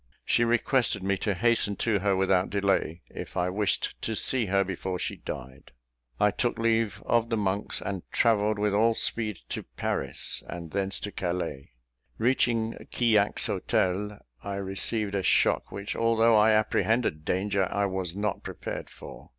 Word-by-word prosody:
She 120 - +3
requested 120 -2 +1
me 100 +1 +1
to 100 +1 -1
hasten 110 0 +2
to 110 -2 +1
her 100 0 +1
without 95 -1 +2
delay, 95 -4 0
if - - -7
I 90 0 +1
wished 100 +1 0
to 110 - -2
see 120 0 +1
her 100 +1 +3
before 95 -1 -4
she - - -4
died. 65 +1 -8 0.5
I 105 - +4
took 120 +4 -1
leave 115 -1 0
of 115 -1 +2
the 115 - 0
monks, 100 0 -1
and 100 -3 -4
travelled 110 -2 +2
with 105 0 +1
all 115 +2 +3
speed 110 -5 0
to - - -3
Paris, - - -2
and 85 -2 -7
thence 100 0 +1
to 105 - -4
Calais. 85 -9 -4 0.4
Reaching 115 -1 +1 0.2
Quillac's 110 -4 +3
hotel, 100 +3 0 0.3
I 100 -1 -4
received 100 +2 0
a 100 - 0
shock - - +2
which, 100 +1 -5
although 115 0 +3
I 105 +1 +6
apprehended 110 -5 +1
danger, 95 +2 0
I 100 0 +1
was 95 -3 -3
not 105 -1 -2
prepared - - -6
for. - - -12
100 Hz, 160 wpm, -27 LUFS, 95-115 Hz, 0.5 s, I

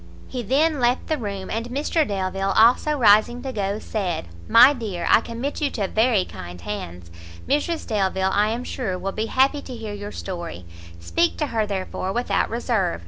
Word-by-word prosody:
He 255 - -4
then 290 +7 +2
left 245 +1 +1
the 315 - -1
room; 200 -4 -5
and 230 +1 -2
Mr 295 +4 0
Delvile 195 0 -1
also 245 +7 +5
rising 240 +1 +4
to 265 -1 -4
go, 200 -1 -1
said, 180 - -3 0.2
"My 250 +5 +8
dear, 210 -9 -4
I - - +6
commit 240 +7 -5
you 290 - +2
to 205 -7 -2
very 220 -2 +2
kind 90 0 -9
hands; 90 -3 -7 0.4
Mrs 305 +4 0
Delvile, 190 -3 0
I 210 +1 +3
am 235 +3 -3
sure, 220 -8 -3
will 195 +2 -3
be 220 +3 -3
happy 270 +4 +2
to 255 - -8
hear 220 -3 -6
your 205 0 -6
story; 170 - -6 0.3
speak 335 - 0
to 305 - 0
her, 220 -2 +1
therefore, 190 -1 -3
without 240 +3 0
reserve. 225 - -1
215 Hz, 185 wpm, -23 LUFS, 190-250 Hz, 0.4 s, My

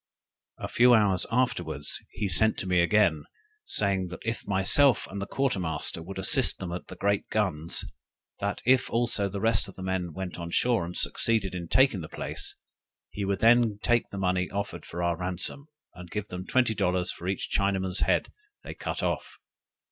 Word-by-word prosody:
A - - -5
few 125 0 +5
hours 100 -4 +3
afterwards 85 - -1
he 105 - -2
sent 110 +5 +3
to - - -3
me 90 -1 +2
again, 85 -5 +3 0.4
saying, 95 -3 +1
that 90 +4 -9
if 115 +1 -3
myself 100 +7 +4
and 100 +1 -6
the 100 - -4
quarter 135 -7 0
master 85 -1 -1
would 95 +4 -8
assist 95 - +1
them 90 -2 -5
at 90 - -6
the - - -9
great 100 0 0
guns, 90 -7 -1 0.5
that 100 0 -3
if 130 +1 +4
also 115 -4 +1
the 100 +1 -5
rest 110 0 +2
of 95 - -11
the 95 - -8
men 95 -2 -2
went 90 +1 -6
on 85 0 -5
shore 115 0 +2
and 90 +1 -7
succeeded 110 -5 0
in 85 -2 -5
taking 130 -3 +3
the 80 - -8
place, - - -6 0.6
he 100 - -4
would 100 0 -1
then 115 -2 +5
take 120 -1 +2
the 100 - -7
money 90 -1 0
offered 100 0 -5
for 85 +1 -4
our 85 -1 +1
ransom, 90 - -4 0.3
and 90 -1 -11
give 105 -1 -4
them 90 +1 -6
twenty 125 -3 +2
dollars 90 -3 0
for 85 - -10
every 95 +1 0
Chinaman's 95 -1 -1
head - - +1 0.3
they - - -7
cut - - -4
off. - - -2
95 Hz, 190 wpm, -27 LUFS, 90-110 Hz, 0.6 s, few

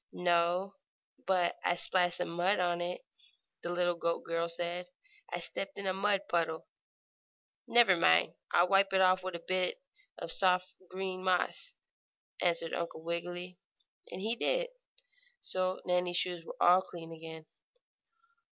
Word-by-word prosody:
"No, 175 +2 +1 0.5
but 180 -2 +2
I 175 - +2
splashed 175 0 +2
some 180 - -2
mud 175 +4 +1
on 175 -1 0
it," 175 +1 -3 0.6
the - - -4
little 175 0 +1
goat 170 0 -2
girl 165 0 -1
said. 175 +1 -3 0.4
"I - - -2
stepped 290 - -5
in 200 - -4
a 190 - +1
mud 195 +1 +1
puddle." 165 -2 -1 1.0
"Never 230 -5 +6
mind, 85 - +4 0.2
I'll 175 - +4
wipe 195 +1 +3
it 190 - +4
off 185 0 +4
with 185 -1 -5
a 170 - -8
bit 185 0 0 0.4
of - - -2
soft 180 -1 +2 0.2
green 185 0 -4
moss," 185 - 0 0.7
answered 170 -2 +1
Uncle 170 -1 -4
Wiggily; 175 +2 -5 0.5
and - - -6
he 225 +3 0
did. - - 0 0.7
So 185 0 -1
Nannie's 180 -1 +1
shoes 175 -1 -1
were - - -9
all 180 +1 +6
clean 170 -3 -9
again. 160 -1 -9
180 Hz, 145 wpm, -32 LUFS, 170-185 Hz, 1.0 s, Never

